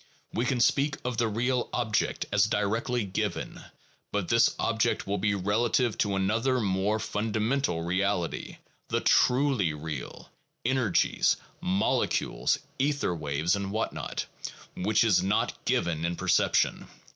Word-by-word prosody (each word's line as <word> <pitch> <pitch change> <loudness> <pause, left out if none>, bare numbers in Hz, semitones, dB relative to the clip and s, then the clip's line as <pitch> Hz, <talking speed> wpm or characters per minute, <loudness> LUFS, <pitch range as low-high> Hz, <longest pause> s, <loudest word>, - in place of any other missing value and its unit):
We 120 - 0
can 125 0 0
speak 140 +4 +2
of 125 -2 -2
the 115 - +2
real 120 +3 0
object 110 -4 0
as 100 +1 +4
directly 110 +3 0
given, 95 - -3 0.5
but - - -2
this - - +4
object - - 0
will 100 0 -1
be 100 0 +1
relative 110 +4 +1
to 100 -2 +1
another 115 +7 +1
more 100 0 +1
fundamental 110 -2 -1
reality, 90 0 -1 0.3
the - - 0
truly 125 - +3
real, 75 -3 -7 0.2
— - - -49
energies, 120 -7 +2 0.2
molecules, 95 +2 +1 0.2
ether 140 -7 +1
waves, 75 +2 0
or 100 -1 -3
what 110 +3 -2
not, - - -4 0.3
— - - -20
which 105 +5 +2
is 100 -6 +4
not 95 +3 -1
given 80 -2 0
in 85 +1 -1
perception. - - +1
105 Hz, 135 wpm, -28 LUFS, 95-120 Hz, 0.5 s, as